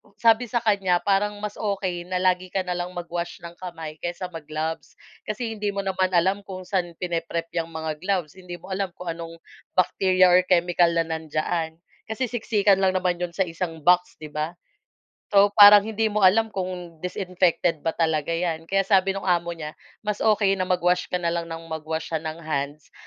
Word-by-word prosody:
Sabi 230 Hz, +2 st, +3 dB
sa 235 Hz, 0 st, -1 dB
kanya, 195 Hz, -5 st, +2 dB
parang 205 Hz, +1 st, +1 dB
mas 210 Hz, 0 st, -5 dB
okey 190 Hz, -4 st, -2 dB
na 185 Hz, -, -3 dB
lagi 185 Hz, 0 st, +2 dB
ka 190 Hz, +1 st, -2 dB
na 180 Hz, -, -4 dB
lang 180 Hz, +1 st, -4 dB
mag-wash 175 Hz, 0 st, -5 dB
ng 170 Hz, 0 st, -9 dB
kamay 165 Hz, -4 st, -7 dB
kaysa 175 Hz, +1 st, -5 dB
mag-gloves, 160 Hz, 0 st, -5 dB, 0.3 s
kasi 225 Hz, +2 st, -3 dB
hindi 210 Hz, -1 st, -3 dB
mo 200 Hz, -, -1 dB
naman 190 Hz, -1 st, +1 dB
alam 190 Hz, +4 st, +3 dB
kung 185 Hz, -1 st, -7 dB
saan 180 Hz, -3 st, -2 dB
pine-prep 170 Hz, -1 st, -3 dB
'yang 165 Hz, -1 st, -1 dB
mga 160 Hz, -2 st, -5 dB
gloves, 185 Hz, -2 st, -2 dB
hindi 180 Hz, -1 st, -8 dB
mo 185 Hz, +3 st, -12 dB
alam 190 Hz, -1 st, -2 dB
kung 180 Hz, -2 st, -5 dB
anong 165 Hz, 0 st, -7 dB, 0.4 s
bacteria 185 Hz, 0 st, +4 dB
or 180 Hz, -, +7 dB
chemical 175 Hz, -1 st, +3 dB
na 165 Hz, -, +3 dB
nandiyaan. 160 Hz, 0 st, -2 dB, 0.3 s
Kasi 230 Hz, +2 st, -3 dB
siksikan 210 Hz, -4 st, +2 dB
lang 190 Hz, -1 st, +2 dB
naman 180 Hz, -1 st, 0 dB
'yon 175 Hz, -1 st, -4 dB
sa 190 Hz, -, +2 dB
isang 165 Hz, -2 st, -5 dB
box, 180 Hz, +2 st, +3 dB
'di 155 Hz, -1 st, -10 dB
ba? 155 Hz, +3 st, -3 dB, 0.8 s
So, 200 Hz, +1 st, +6 dB
parang 205 Hz, 0 st, +10 dB
hindi 220 Hz, +1 st, -1 dB
mo 210 Hz, -, 0 dB
alam 210 Hz, +4 st, +5 dB
kung 180 Hz, -3 st, -5 dB
disinfected 180 Hz, -3 st, 0 dB
ba 165 Hz, -, +1 dB
talaga 160 Hz, -2 st, 0 dB
'yan. 165 Hz, -1 st, -2 dB
Kaya 195 Hz, 0 st, +2 dB
sabi 195 Hz, 0 st, +3 dB
nung 195 Hz, -, -5 dB
amo 175 Hz, -1 st, +1 dB
niya, 155 Hz, -1 st, -6 dB, 0.3 s
mas 210 Hz, -1 st, -1 dB
okey 210 Hz, -2 st, +3 dB
na 185 Hz, -, -2 dB
mag-wash 180 Hz, 0 st, +1 dB
ka 180 Hz, -, 0 dB
na 170 Hz, -1 st, -1 dB
lang 170 Hz, -1 st, -3 dB
nang 165 Hz, 0 st, -6 dB
mag-wash 160 Hz, 0 st, -4 dB
siya 160 Hz, -, 0 dB
ng 160 Hz, 0 st, -5 dB
hands 145 Hz, -1 st, -4 dB
180 Hz, 195 wpm, -24 LUFS, 165-195 Hz, 0.8 s, parang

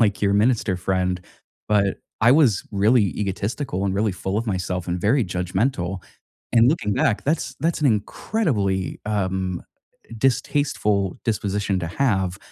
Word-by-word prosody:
like 105 Hz, -3 st, +2 dB
your 100 Hz, -, +3 dB
minister 105 Hz, -3 st, +2 dB
friend, 90 Hz, 0 st, -1 dB, 0.5 s
but 100 Hz, -2 st, +2 dB, 0.2 s
I 115 Hz, +3 st, +6 dB
was 135 Hz, -10 st, +4 dB
really 105 Hz, +3 st, +4 dB
egotistical, 100 Hz, +1 st, -2 dB
and 95 Hz, -, -1 dB
really 105 Hz, 0 st, +1 dB
full 95 Hz, +2 st, -3 dB
of 115 Hz, -, -3 dB
myself, 90 Hz, -3 st, -2 dB
and 90 Hz, 0 st, -2 dB
very 115 Hz, +5 st, +3 dB
judgmental. 90 Hz, +1 st, -1 dB, 0.5 s
And 115 Hz, +1 st, +6 dB
looking 110 Hz, -9 st, +1 dB
back, 130 Hz, -9 st, +1 dB
that's 155 Hz, +3 st, -1 dB
that's 165 Hz, 0 st, 0 dB
an 145 Hz, -, +4 dB
incredibly, 105 Hz, -, -1 dB
um, 95 Hz, -3 st, -1 dB, 0.6 s
distasteful 110 Hz, -7 st, +1 dB
disposition 100 Hz, -3 st, -1 dB
to 85 Hz, -, -3 dB
have. 95 Hz, -4 st, 0 dB
100 Hz, 140 wpm, -23 LUFS, 95-120 Hz, 0.6 s, I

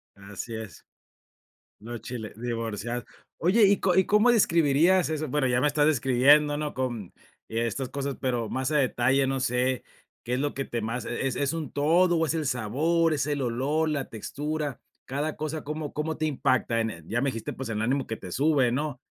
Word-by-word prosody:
Así 100 Hz, +3 st, -7 dB
es. 110 Hz, -2 st, -9 dB, 1.0 s
Los 115 Hz, +1 st, -7 dB
chilaq 115 Hz, -1 st, -7 dB
divorciados. 115 Hz, 0 st, -3 dB, 0.3 s
Oye, 205 Hz, +6 st, +4 dB
¿y 200 Hz, 0 st, +3 dB, 0.2 s
y 190 Hz, -, +5 dB
cómo 210 Hz, +4 st, +5 dB
describirías 170 Hz, -2 st, +4 dB
eso? 155 Hz, -1 st, -2 dB
Bueno, 135 Hz, 0 st, +1 dB
ya 125 Hz, 0 st, +2 dB
me 150 Hz, -, +2 dB
estás 145 Hz, 0 st, +2 dB
describiendo, 145 Hz, +2 st, +4 dB
¿no? 150 Hz, 0 st, -3 dB
Con 120 Hz, -7 st, -3 dB, 0.4 s
y 115 Hz, -, -3 dB
estas 120 Hz, +3 st, -1 dB
cosas, 140 Hz, -1 st, -3 dB
pero 120 Hz, -4 st, -1 dB
más 130 Hz, +3 st, -2 dB
a 150 Hz, -, +3 dB
detalle, 130 Hz, +1 st, +2 dB
no 135 Hz, 0 st, -1 dB
sé, 125 Hz, -1 st, 0 dB, 0.4 s
¿qué 125 Hz, +1 st, -1 dB
es 130 Hz, -, -1 dB
lo 145 Hz, 0 st, 0 dB
que 135 Hz, -, -2 dB
te 120 Hz, -, -3 dB
más 115 Hz, +2 st, -3 dB
e 135 Hz, +3 st, -2 dB
es 140 Hz, +3 st, -1 dB
un 160 Hz, -4 st, -4 dB
todo 170 Hz, +4 st, +3 dB
o 165 Hz, -, +2 dB
es 155 Hz, -, -1 dB
el 155 Hz, -3 st, -1 dB
sabor, 155 Hz, +9 st, +1 dB
es 145 Hz, -, -1 dB
el 145 Hz, -2 st, -1 dB
olor, 140 Hz, +7 st, 0 dB
la 140 Hz, -3 st, -1 dB
textura? 145 Hz, +4 st, -4 dB, 0.2 s
Cada 145 Hz, +4 st, -3 dB
cosa, 155 Hz, 0 st, -4 dB
¿cómo 150 Hz, 0 st, -5 dB
cómo 155 Hz, +1 st, -2 dB
te 155 Hz, -, -2 dB
impacta 130 Hz, -5 st, +1 dB
en 115 Hz, 0 st, 0 dB
el? 80 Hz, -3 st, -11 dB
Ya 120 Hz, +2 st, 0 dB
me 140 Hz, -, +1 dB
dijiste, 115 Hz, -4 st, -4 dB
pues, 135 Hz, -3 st, -6 dB
el 110 Hz, -1 st, -2 dB
ánimo 135 Hz, +3 st, 0 dB
que 110 Hz, -, -4 dB
te 90 Hz, -, -9 dB
sube, 140 Hz, -4 st, +3 dB
¿no? 145 Hz, +1 st, -2 dB
135 Hz, 200 wpm, -27 LUFS, 120-150 Hz, 1.0 s, y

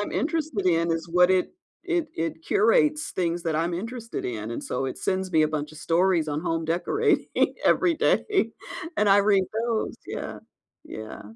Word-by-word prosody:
I'm 205 Hz, -, -3 dB
interested 305 Hz, -, -1 dB
in 170 Hz, -1 st, +2 dB
is 165 Hz, +1 st, -3 dB
what 180 Hz, +1 st, +5 dB
it 185 Hz, -1 st, +2 dB, 0.3 s
it 345 Hz, -3 st, 0 dB
it 165 Hz, -, -3 dB
curates 410 Hz, -9 st, +3 dB
things 175 Hz, -1 st, -1 dB
that 160 Hz, -2 st, 0 dB
I'm 170 Hz, +2 st, 0 dB
interested 230 Hz, +5 st, -5 dB
in, 110 Hz, -2 st, -4 dB
and, -, -, -5 dB
so, 135 Hz, -, -2 dB
it 130 Hz, -, -5 dB
sends 190 Hz, -1 st, -1 dB
me 160 Hz, -1 st, +5 dB
a 155 Hz, -, +2 dB
bunch 150 Hz, 0 st, -3 dB
of 155 Hz, -, -12 dB
stories 170 Hz, -1 st, +2 dB
on 150 Hz, +1 st, -2 dB
home 165 Hz, -1 st, -1 dB
decorating 180 Hz, -, +1 dB, 0.4 s
every 345 Hz, -2 st, +4 dB
day, 380 Hz, -, +1 dB, 0.4 s
and 210 Hz, -, +3 dB
I 195 Hz, +1 st, +6 dB
read 200 Hz, -2 st, +4 dB, 0.2 s
those, 230 Hz, -2 st, -1 dB
yeah. -, -, -5 dB, 0.5 s
Yeah. 110 Hz, 0 st, -8 dB
185 Hz, 180 wpm, -25 LUFS, 165-240 Hz, 0.5 s, I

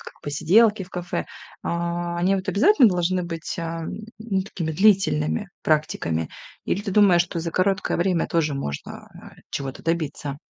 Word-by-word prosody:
как -, -, -11 dB
посиделки 200 Hz, +9 st, +3 dB
в 180 Hz, -, -20 dB
кафе, 175 Hz, -1 st, -4 dB, 0.4 s
а, 170 Hz, 0 st, -2 dB
они 185 Hz, +3 st, +2 dB
вот 190 Hz, -1 st, -3 dB
обязательно 250 Hz, -, +5 dB
должны 180 Hz, 0 st, 0 dB
быть, 165 Hz, -1 st, -5 dB
ам, 165 Hz, -1 st, -4 dB, 0.3 s
ну, 210 Hz, -4 st, -1 dB
такими 170 Hz, -4 st, -4 dB
длительными 150 Hz, -, +2 dB
практиками? 85 Hz, -, 0 dB, 0.4 s
Или 200 Hz, -, -1 dB
ты 205 Hz, -, -4 dB
думаешь, 185 Hz, -3 st, +5 dB
что 175 Hz, 0 st, -5 dB
за 165 Hz, 0 st, -3 dB
короткое 195 Hz, +2 st, +1 dB
время 175 Hz, -1 st, +1 dB
тоже 155 Hz, -3 st, 0 dB
можно, 70 Hz, -, -6 dB
а, -, -, -13 dB, 0.2 s
чего-то 135 Hz, -2 st, -5 dB
добиться? 155 Hz, -4 st, -2 dB
175 Hz, 155 wpm, -23 LUFS, 155-190 Hz, 0.4 s, обязательно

